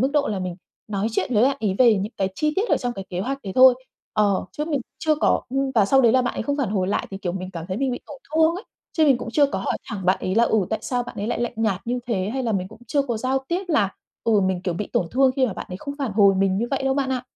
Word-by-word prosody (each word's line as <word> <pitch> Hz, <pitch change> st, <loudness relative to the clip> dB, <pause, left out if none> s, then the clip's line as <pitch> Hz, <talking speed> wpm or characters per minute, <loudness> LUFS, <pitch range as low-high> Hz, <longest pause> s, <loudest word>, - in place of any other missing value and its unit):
mức 265 Hz, +3 st, +2 dB
độ 290 Hz, -1 st, +2 dB
là 205 Hz, -, -2 dB
mình 180 Hz, -1 st, -4 dB, 0.3 s
nói 205 Hz, 0 st, -1 dB
chuyện 235 Hz, +2 st, -1 dB
với 210 Hz, -, +4 dB
bạn 275 Hz, +1 st, +3 dB
ấy 205 Hz, -4 st, 0 dB
về 240 Hz, -3 st, +6 dB
những 200 Hz, +4 st, -3 dB
cái 190 Hz, -, 0 dB
chi 305 Hz, +6 st, 0 dB
tiết 420 Hz, +5 st, +1 dB
ở -, -, +4 dB
trong 245 Hz, -1 st, -2 dB
cái 195 Hz, -4 st, -7 dB
kế 180 Hz, -1 st, -3 dB
hoạch 270 Hz, +7 st, -2 dB
đấy 195 Hz, -, -5 dB
thôi, 255 Hz, -1 st, +8 dB, 0.4 s
ờ, 205 Hz, -2 st, +2 dB
chứ 300 Hz, -, -3 dB
mình 295 Hz, -4 st, -1 dB, 0.2 s
chưa 310 Hz, +2 st, +2 dB
có 300 Hz, -, +2 dB
ưm, 270 Hz, +1 st, -1 dB
và 220 Hz, -, +5 dB
sau 265 Hz, +7 st, +4 dB
đấy 235 Hz, -3 st, +5 dB
là 255 Hz, -, +4 dB
bạn 245 Hz, -, -2 dB
ấy -, -, -2 dB
không 285 Hz, +4 st, -1 dB
phản 270 Hz, -8 st, 0 dB
hồi 190 Hz, -3 st, 0 dB
lại 205 Hz, -, -1 dB
thì, 195 Hz, -, -5 dB
kiểu, 175 Hz, -3 st, -3 dB
mình 185 Hz, 0 st, -5 dB
cảm 170 Hz, -3 st, -6 dB
thấy 185 Hz, -, -2 dB
mình 270 Hz, +2 st, 0 dB
bị -, -, -4 dB
tổn 280 Hz, -, -10 dB, 0.2 s
thương 320 Hz, +1 st, +4 dB
ấy. 380 Hz, +6 st, -7 dB, 0.3 s
Chứ 320 Hz, -, +5 dB
mình 270 Hz, -5 st, +4 dB
cũng -, -, -6 dB
chưa 290 Hz, +1 st, +5 dB
có 280 Hz, -, -3 dB
hỏi -, -, -1 dB
thẳng 205 Hz, -6 st, -5 dB
bạn 185 Hz, -, +3 dB
ấy 185 Hz, -, -2 dB
là, 230 Hz, +2 st, +5 dB
ừ, 220 Hz, -, +2 dB
tại 220 Hz, -, 0 dB
sao 250 Hz, -1 st, -1 dB
bạn 245 Hz, -, -10 dB
ấy 205 Hz, -, -2 dB
lại 240 Hz, -, -2 dB
lạnh 240 Hz, -, -1 dB
nhạt 220 Hz, -4 st, 0 dB
như 245 Hz, +1 st, -1 dB
thế, 195 Hz, -5 st, -1 dB
hay 265 Hz, 0 st, -2 dB
là 230 Hz, -, 0 dB
mình 185 Hz, -2 st, -1 dB
cũng 220 Hz, +2 st, -15 dB
chưa 285 Hz, +4 st, +1 dB
có 245 Hz, -4 st, -2 dB
giao 260 Hz, +4 st, 0 dB
tiếp 360 Hz, +3 st, -1 dB
là, 225 Hz, -, +3 dB, 0.4 s
ừ, 220 Hz, -3 st, +4 dB
mình, 190 Hz, -2 st, 0 dB
kiểu, 180 Hz, -3 st, -1 dB
bị 205 Hz, +4 st, -3 dB
tổn 175 Hz, -, +1 dB
thương 265 Hz, +1 st, +4 dB
khi 260 Hz, -, +3 dB
mà 220 Hz, -, -3 dB
bạn -, -, -7 dB
ấy 180 Hz, -, -5 dB
không 280 Hz, +8 st, -6 dB
phản 265 Hz, -7 st, -2 dB
hồi 200 Hz, -2 st, +5 dB
mình 190 Hz, 0 st, +2 dB
như 235 Hz, -, 0 dB
vậy 275 Hz, -, -1 dB
đâu 270 Hz, 0 st, +1 dB
bạn 270 Hz, -1 st, 0 dB
ạ. 255 Hz, -2 st, -1 dB
235 Hz, 330 wpm, -23 LUFS, 195-270 Hz, 0.4 s, thôi